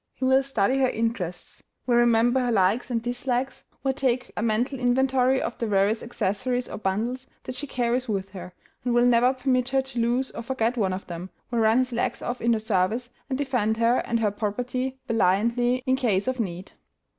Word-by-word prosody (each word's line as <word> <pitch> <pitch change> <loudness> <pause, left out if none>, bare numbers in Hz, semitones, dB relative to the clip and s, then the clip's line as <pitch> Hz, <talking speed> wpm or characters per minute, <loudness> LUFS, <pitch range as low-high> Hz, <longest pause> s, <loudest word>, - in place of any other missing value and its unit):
He 260 - -2
will 265 +1 +5
study 265 -1 +1
her 260 -1 +3
interests; 215 -7 -3 0.2
will 240 -1 +3
remember 240 +1 +4
her 245 -1 0
likes 205 +4 +2
and 230 -2 -1
dislikes; 245 +2 -2 0.2
will 270 -1 +1
take 255 -2 -1
a - - -2
mental 235 +4 0
inventory 260 +1 +2
of - - -4
the 230 - -1
various 205 +2 +2
accessories 245 +2 -2
or - - -7
bundles 230 +7 -2 0.2
that 255 - -6
she 290 - -5
carries 250 -1 -1
with 195 -2 -2
her, 180 -2 -8 0.3
and 245 -1 0
will 240 0 +5
never 245 +1 +5
permit 255 -1 0
her 270 0 +2
to 265 -2 -6
lose 245 +3 0
or - - -6
forget 235 -1 -1
one 200 -6 +1
of 185 +1 -4
them; 175 +1 -7 0.2
will 235 - 0
run 220 +1 +4
his 255 -1 +1
legs 235 - -2
off 245 +1 -3
in 235 0 +3
her - - +2
service, 215 +3 0 0.2
and 260 - -1
defend 250 -6 0
her 230 +2 +3
and 230 -1 -1
her 210 -2 +2
property 250 +5 -3
valiantly 235 +4 +2
in 260 -1 +3
case 215 -6 +1
of 260 -1 -1
need. 185 -3 -4
240 Hz, 200 wpm, -25 LUFS, 220-255 Hz, 0.3 s, will